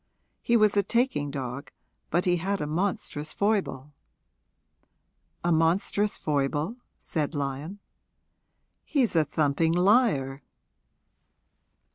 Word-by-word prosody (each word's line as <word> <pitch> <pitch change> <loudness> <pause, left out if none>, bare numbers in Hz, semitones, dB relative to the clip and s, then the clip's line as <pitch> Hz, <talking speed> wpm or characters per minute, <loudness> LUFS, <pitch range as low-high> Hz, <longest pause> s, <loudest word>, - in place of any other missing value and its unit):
He 235 - +3
was 215 -2 +3
a 200 - +5
taking 200 - 0
dog, 135 0 -5 0.4
but 175 +1 +1
he 175 -1 +3
had 195 +3 -2
a - - -2
monstrous 155 -2 -2
foible. 185 -10 -1 1.5
'A 175 - +1
monstrous 175 +5 +2
foible?' 150 - -1 0.2
said 155 -1 -3
Lyon. 145 +6 -4 1.1
'He's 260 - 0
a 160 - +5
thumping 155 +2 +1
liar.' 175 - +3
165 Hz, 100 wpm, -27 LUFS, 145-200 Hz, 1.5 s, a